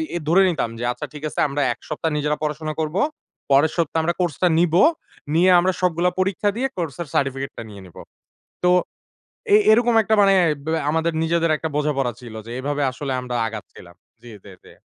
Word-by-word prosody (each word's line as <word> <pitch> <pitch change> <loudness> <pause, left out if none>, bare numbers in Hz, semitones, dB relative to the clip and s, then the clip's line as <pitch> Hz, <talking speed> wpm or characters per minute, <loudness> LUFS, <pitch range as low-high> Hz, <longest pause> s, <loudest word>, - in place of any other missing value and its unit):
I - - -1
ধরে 180 +4 +5
নিতাম, 155 -9 -1
যে - - -4
আচ্ছা - - -6
ঠিক 150 0 -10
আছে - - -6
আমরা 140 +1 -2
এক - - -23
সপ্তাহ 160 +1 -2
নিজেরা 150 0 -1
পড়াশোনা 155 +1 -3
করব। 155 +1 -3 0.6
পরের 145 +3 +4
সপ্তাহে 165 -1 0
আমরা 170 +2 0
কোর্স 175 -6 -1
টা - - +6
নিবো। 175 +1 +4 0.5
নিয়ে 180 +3 +4
আমরা 185 +2 +2
সবগুলা 180 0 +2
পরীক্ষা 195 +2 +1
দিয়ে, 265 +2 0
কোর্সের 170 -1 -4
সার্টিফিকেট 135 0 -1
টা - - -6
নিয়ে 100 -2 -11
নিবো। 90 - -13 0.6
তো 180 - +5 0.8
এ - - +9 0.2
এরকম 240 +1 +3
একটা 220 +1 +1
মানে 195 -1 +5 0.3
ব্যা 160 0 0
আমাদের 160 +2 0
নিজেদের 165 0 +1
একটা 160 - -4
বোঝাপড়া 140 -4 0
ছিল, 120 -3 -11
যে - - -9
এভাবে 145 +2 -2
আসলে 135 +1 -4
আমরা 125 -1 -6
আগাচ্ছিলাম। 105 -5 -11 0.3
জি, 120 - -12
জি, 100 - -12
জি। - - -15
155 Hz, 195 wpm, -21 LUFS, 135-175 Hz, 0.8 s, এ